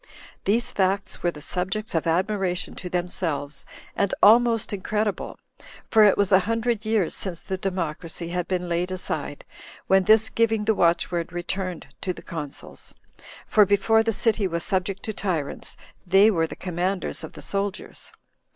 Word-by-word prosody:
These 230 +4 +1
facts 195 0 0
were 175 - +2
the 150 -3 -8
subjects 190 +7 -3
of 165 -1 0
admiration 185 +1 0
to 180 - -7
themselves, 165 -5 -3 0.3
and 200 -1 +1
almost 230 0 +5
incredible; 210 +1 -2 0.5
for 220 - +7
it 205 - +5
was 200 -1 +2
a 190 - +7
hundred 230 -1 0
years 215 -6 +1
since 175 -4 -4
the 190 - -3
democracy 170 -3 -3
had 180 0 -2
been 180 -1 -1
laid 175 +1 -1
aside, 185 0 -4 0.4
when 190 -1 +4
this 220 +2 +5
giving 225 -2 +1
the 220 - +3
watchword 170 -2 +1
returned 180 0 -4 0.2
to 185 - -2
the - - -12
consuls; 150 -4 -7 0.5
for 215 - +5
before 205 +3 +3
the 225 0 +1
city 220 -2 +1
was 170 -1 -2
subject 195 -1 -1
to 215 - -4
tyrants, 175 -9 -3 0.3
they 195 +4 +6
were 165 -4 +1
the - - -8
commanders 185 +1 -2
of - - -8
the - - -10
soldiers. 200 0 -4
190 Hz, 160 wpm, -24 LUFS, 175-210 Hz, 0.5 s, for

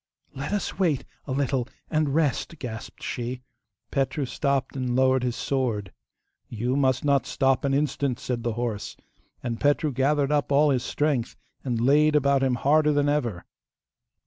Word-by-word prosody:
'Let 135 +6 -5
us 205 -1 -2
wait 165 -8 +1 0.2
a - - -4
little 135 -2 0 0.2
and 155 -3 +1
rest,' 160 +1 0
gasped 115 -5 -7
she. 125 +1 -4 0.5
Petru 140 +1 0
stopped 140 0 -1
and 125 -2 -1
lowered 130 0 +3
his 125 -1 -1
sword. 120 -8 -2 0.6
'You 120 +3 -1
must 130 -1 +1
not 140 -2 +2
stop 135 -1 +1
an 135 -1 +1
instant,' 140 -3 0
said 125 -2 -3
the 120 -1 -1
horse, 115 -3 -4 0.5
and 115 -2 -3
Petru 145 +1 +2
gathered 140 +2 +1
up 145 -1 +1
all 145 +1 +5
his 130 -2 +1
strength, 145 -5 -1 0.3
and 120 -4 -1
laid 150 +5 +4
about 140 -1 +3
him 130 -2 +2
harder 150 +5 +3
than 145 0 +2
ever. 120 -11 -1
135 Hz, 160 wpm, -26 LUFS, 125-145 Hz, 0.6 s, all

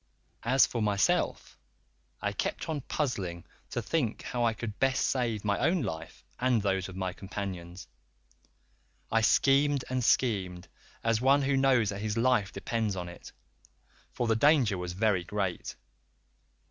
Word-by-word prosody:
"As 130 +3 +4
for 120 - -3
myself 100 -3 0 0.6
I - - +1
kept - - -3
on 155 -3 -2
puzzling 100 - -3 0.2
to - - -3
think 130 -9 -1
how 120 -1 -2
I 115 - +3
could 110 -3 -6
best 135 -1 +2
save 115 -5 -1
my 100 -1 +1
own 170 -3 +2
life 80 -6 -6 0.2
and 125 -2 +3
those 95 -2 -1
of 95 - -9
my 95 -1 -3
companions; 95 -3 -6 1.2
I 115 - +3
schemed 140 +4 +3
and 130 -1 0
schemed, 95 -8 +1 0.4
as 115 0 +1
one 140 +2 +4
who 135 0 +1
knows 130 -5 +3
that 100 0 -4
his 110 +1 -2
life 115 -4 +2
depends 110 -4 -2
upon 90 -1 -5
it, 85 - -11 0.8
for 120 - -2
the 115 -1 +2
danger 130 -4 +4
was 90 -1 -4
very 100 -2 +1
great. 95 -1 -3
110 Hz, 150 wpm, -29 LUFS, 95-130 Hz, 1.2 s, As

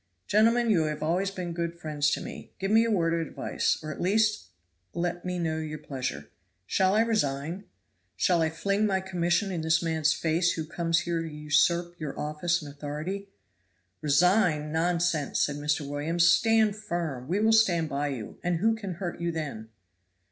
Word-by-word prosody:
"Gentlemen, 230 +2 +3
you 165 -6 +3
have 150 0 -3
always 180 +5 +1
been 180 -3 -5
good 170 0 -3
friends 150 -3 0
to - - -1
me - - -9
give 195 +1 -2
me 225 +1 +6
a - - 0
word 170 -6 +2
of 170 - +1
advice, 165 - -1
or 155 - -4
at - - -7
least 210 - +2 0.5
let 175 0 -2
me 180 0 -2
know 160 -2 -1
your 155 -1 -5
pleasure. 130 - -5 0.3
Shall 190 - +2
I 220 - +5
resign 175 -5 -1 0.5
shall 175 -3 +3
I 160 - +2
fling 200 +6 0
my 190 -2 +1
commission 180 +1 0
in 175 -3 -2
this 160 +1 +2
man's 160 -2 +1
face 165 +2 +1
who 160 - -4
comes 165 +1 0
here 170 -1 -1
to 165 - -5
usurp 170 +3 +1
your 150 -3 -5
office 155 +3 -1
and 145 -1 -9
authority?" 155 +8 -5 0.7
"Resign! 155 0 +3
Nonsense!" 165 -2 0
said 145 -1 +1
Mr. 150 0 -1
Williams. 155 +4 +1
"Stand 220 +2 +4
firm. 170 -11 -4
We 185 +6 0
will 220 +1 +4
stand 180 -8 +4
by 145 0 -2
you, 130 -6 -6
and 175 -1 0
who 220 +6 +2
can 200 -5 -5
hurt 175 -1 -5
you 170 0 0
then?" 140 -9 -5
170 Hz, 185 wpm, -28 LUFS, 150-190 Hz, 0.7 s, me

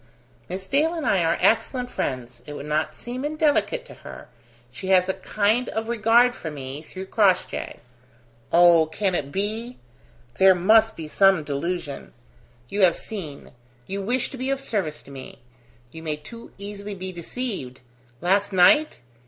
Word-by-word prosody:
"Miss 190 +1 -5
Dale 310 - +1
and 320 -3 -4
I 185 -3 +2
are 165 - +1
excellent 245 +5 +1
friends. 125 -2 -4
It 150 - -6
would 140 - -7
not 150 +1 -1
seem 250 +2 -6
indelicate 310 +11 +1
to - - -12
her. - - -11 0.4
She 130 +9 -8
has 185 -1 +4
a 190 - 0
kind 215 +5 0
of 220 0 -3
regard 235 +2 +4
for 165 - -6
me, 140 -1 -7
through 185 +4 -8
Crossjay. 190 -2 +1 0.8
Oh, 170 -2 +6
can 190 +4 -1
it 140 -5 -2
be? 220 - -3 0.6
There 190 -1 +7
must 220 +5 +4
be 160 -2 -7
some 190 0 +4
delusion. 150 +1 -4 0.5
You 200 +10 -2
have 180 -3 +5
seen 165 -10 -7 0.3
you 195 +6 -4
wish 245 +5 -1
to 270 - -8
be 260 +1 -3
of 275 0 0
service 190 - -3
to - - -14
me; 135 -1 -10 0.5
you 160 - -10
may 155 -2 -2
too 230 +11 -12
easily 200 0 -7
be 185 0 -6
deceived. 175 - -5 0.4
Last 200 +3 +2
night? 200 +12 +4
190 Hz, 160 wpm, -24 LUFS, 160-230 Hz, 0.8 s, There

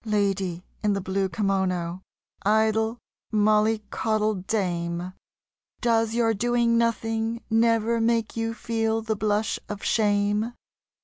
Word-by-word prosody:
Lady 195 -5 -1 0.2
in 210 -1 +2
the 200 - -1
blue 190 0 -1
kimono, 185 -2 -1 0.4
idle 220 +2 +2 0.3
mollycoddle 215 0 +2
dame, 180 -3 -2 0.7
Does 225 -2 +1
your 230 -1 +3
doing 235 +2 +2
nothing 230 0 0
never 230 0 +3
make 230 -1 +1
you 225 0 -2
feel 225 -1 -1
the 220 0 -1
blush 210 0 0
of 205 -1 -6
shame? 210 +1 +1
215 Hz, 110 wpm, -25 LUFS, 195-225 Hz, 0.7 s, your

